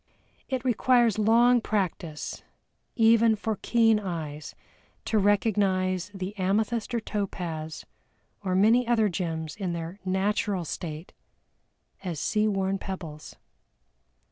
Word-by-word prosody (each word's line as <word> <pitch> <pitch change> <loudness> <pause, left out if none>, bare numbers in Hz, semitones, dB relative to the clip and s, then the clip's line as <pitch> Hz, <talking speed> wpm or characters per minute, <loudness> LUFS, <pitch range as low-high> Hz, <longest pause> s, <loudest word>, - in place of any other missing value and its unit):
It 260 -1 -2
requires 240 -2 +3
long 235 +3 +5
practice 180 -8 -3 0.5
even 225 0 +5
for 215 0 -3
keen 225 -2 +3
eyes 160 -6 -5 0.5
to 220 - +1
recognize 195 -3 +1
the 195 0 -6
amethyst 215 +5 0
or - - +2
topaz, 175 -7 -4 0.6
or 185 -2 0
many 230 +5 +4
other 225 -3 +3
gems, 160 -3 -3
in 190 -4 -3
their 170 +3 -6
natural 195 0 0
state 160 +1 -6 0.9
as 175 -5 -4
sea 215 0 +1
worn 195 -1 0
pebbles. 165 -6 -7
200 Hz, 110 wpm, -27 LUFS, 180-220 Hz, 0.9 s, long